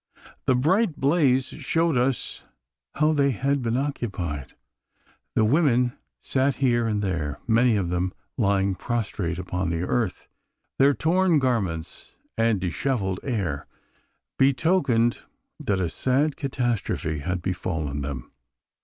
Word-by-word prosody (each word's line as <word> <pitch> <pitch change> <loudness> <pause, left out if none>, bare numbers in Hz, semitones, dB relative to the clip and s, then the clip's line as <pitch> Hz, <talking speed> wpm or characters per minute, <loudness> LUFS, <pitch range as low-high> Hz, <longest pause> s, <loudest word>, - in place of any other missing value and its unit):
The 130 - +4
bright 170 - +2
blaze 135 -3 +3
showed 165 +2 0
us 125 +1 -1 0.5
how 155 +2 +3
they 140 -2 +3
had 140 +3 0
been 120 0 0
occupied. 100 - -3 0.8
The 110 - +4
women 125 -2 +3 0.3
sat 135 0 +1
here 120 -4 +2
and 105 -2 0
there, 80 -6 -2
many 115 0 +4
of 90 -4 -1
them 90 +1 0 0.2
lying 100 -4 +2
prostrate 100 -5 -2
upon 90 -1 -2
the 85 +1 -1
earth. 110 +1 -1 0.5
Their 140 +1 +5
torn 170 - +3
garments 105 - -2 0.2
and 115 -3 +2
dishevelled 95 - -1
air 95 - -2 0.7
betokened 135 -4 +3 0.4
that 100 -2 0
a 90 - +1
sad 135 - +1
catastrophe 120 - -2
had 90 +4 -3
befallen 80 -6 -2
them! 65 -3 -5
115 Hz, 120 wpm, -25 LUFS, 90-135 Hz, 0.8 s, Their